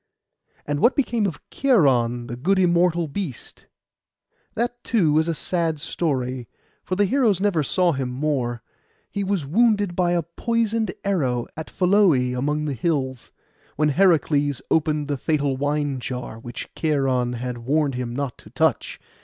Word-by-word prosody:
And 145 0 -2
what 240 - +4
became 235 -6 +1
of 160 -8 -7
Cheiron, 130 - +2
the 120 - -6
good 185 +11 +1
immortal 175 -2 +3
beast? 150 - -7 0.9
That, 240 +1 -2
too, 160 -10 +2
is 160 - 0
a 165 - -1
sad 165 -2 -1
story; 130 -6 -2 0.3
for 185 - -2
the 205 +2 +3
heroes 225 -4 +2
never 195 -5 +1
saw 175 +4 +2
him 135 -4 -2
more. 125 -3 -2 0.5
He 200 - -2
was 190 -6 -1
wounded 205 - +2
by 175 -1 +2
a 170 -1 +1
poisoned 225 +4 -1
arrow, 135 -12 0
at 160 - -7
Pholoe 190 -1 +4 0.2
among 150 +4 -1
the 145 - -2
hills, 130 -2 -2 0.4
when 150 +1 +2
Heracles 145 -4 +2
opened 155 -2 +1
the 145 -1 -1
fatal 145 -3 0
wine 145 0 -1
jar, 125 -2 -6
which 120 +1 -7
Cheiron 135 -5 0
had 125 0 -4
warned 140 +4 +1
him 125 -1 -4
not 140 -2 -4
to - - -15
touch. - - 0
150 Hz, 155 wpm, -23 LUFS, 130-185 Hz, 0.9 s, what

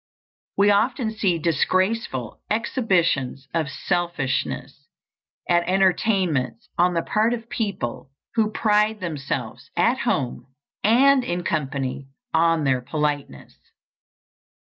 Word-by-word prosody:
We 200 +1 +5
often 225 +3 +1
see 200 -6 +1
disgraceful 170 - 0
exhibitions 170 - 0
of 160 -4 0
selfishness 145 -3 -2 0.6
at 175 -1 +4
entertainments 185 - +1
on 175 0 +2
the 165 - +1
part 220 +3 +1
of 230 0 -11
people 195 - -3 0.2
who 220 -2 +2
pride 215 0 +2
themselves 135 - -4
at 235 +9 +3
home 130 - -1 0.4
and 260 +5 +5
in 180 -7 -2
company 135 -4 -2 0.3
on 165 -1 +3
their 130 -2 +2
politeness. 145 - -3
175 Hz, 100 wpm, -23 LUFS, 140-215 Hz, 0.6 s, We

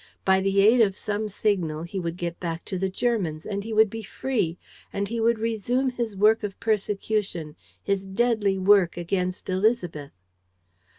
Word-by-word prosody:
By 190 0 +4
the 195 0 +3
aid 225 +4 +6
of 195 -4 +2
some 210 +1 -2
signal, 180 -7 -1
he 180 +3 -4
would 170 -1 -4
get 170 -1 -4
back 165 -1 -4
to 185 - -4
the 190 +1 0
Germans! 185 -7 -1
And 200 -1 -3
he 225 - -6
would 220 -1 +4
be 225 - -5
free! 210 -6 -2 0.3
And 200 0 -2
he 230 +2 -3
would 230 +1 +3
resume 230 +4 0
his 235 -4 -3
work 215 +3 +4
of 205 -3 -5
persecution, 205 -6 -1 0.3
his 195 -1 -1
deadly 205 -1 +1
work, 190 -2 +4
against 180 +1 -2
Élisabeth! 185 -7 0
200 Hz, 170 wpm, -25 LUFS, 180-220 Hz, 0.3 s, aid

